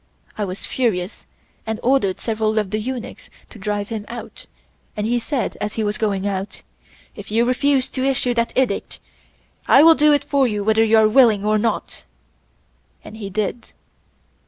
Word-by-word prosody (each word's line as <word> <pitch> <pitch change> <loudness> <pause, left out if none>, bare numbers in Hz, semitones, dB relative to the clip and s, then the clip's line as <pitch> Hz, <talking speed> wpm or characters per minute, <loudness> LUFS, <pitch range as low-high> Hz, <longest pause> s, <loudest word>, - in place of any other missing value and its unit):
I 210 - -2
was 185 +1 -6
furious 205 -7 -2 0.4
and 220 0 -3
ordered 245 -7 +1
several 220 -1 -1
of 210 -3 0
the 215 - -1
eunuchs 245 +2 -6 0.2
to 225 - -12
drive 205 0 -3
him 220 -2 -4
out, 235 0 -9 0.5
and 210 - -1
he 240 +2 +1
said 245 -2 -3
as 210 0 -3
he 220 - -1
was 210 0 -2
going 200 -3 -1
out: 195 0 -4 0.5
'If - - -10
you 225 +3 +2
refuse 265 +1 +1
to 260 - -3
issue 260 -2 +1
that 235 0 0
Edict, 255 -6 -1 0.7
I 280 - +7
will 330 0 +8
do 300 -1 +4
it 290 - +2
for 275 -2 +2
you 210 -3 -2
whether 220 +1 +3
you 225 0 +4
are 220 -1 +5
willing 215 -3 +4
or 215 0 +2
not,' 230 +2 -3 1.0
and 220 - -11
he 205 -3 -6
did. 215 +4 -4
220 Hz, 180 wpm, -20 LUFS, 210-250 Hz, 1.0 s, will